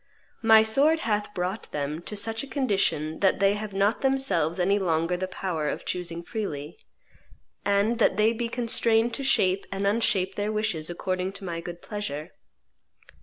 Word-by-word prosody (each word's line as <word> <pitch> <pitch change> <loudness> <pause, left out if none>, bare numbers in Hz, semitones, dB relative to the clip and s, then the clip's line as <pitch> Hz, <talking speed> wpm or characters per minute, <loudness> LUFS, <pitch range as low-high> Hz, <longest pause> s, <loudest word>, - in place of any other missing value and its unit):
My 220 -1 +7
sword 285 +9 +3
hath 210 -2 -1
brought 185 +4 -3
them 150 +2 -3
to 210 - -5
such 225 +2 0
a 280 - -7
condition 195 - 0
that 190 -2 +2
they 200 0 +4
have 210 0 -5
not 200 +3 +1
themselves 265 - +1
any 195 +3 +2
longer 165 -1 +1
the 185 +1 -3
power 175 -5 -3
of - - -5
choosing 170 -1 -4
freely, 170 -8 -5 0.8
and 205 +4 +1
that 220 - +3
they 215 +2 +4
be 235 0 -3
constrained 230 -1 +2
to 275 - -3
shape 195 -7 +2
and 195 0 -2
unshape 200 -3 +1
their 205 +2 -2
wishes 210 -8 -1
according 185 +2 -2
to 195 0 -7
my 170 -2 -4
good 175 0 -8
pleasure. 155 -8 -5
200 Hz, 170 wpm, -26 LUFS, 175-220 Hz, 0.8 s, My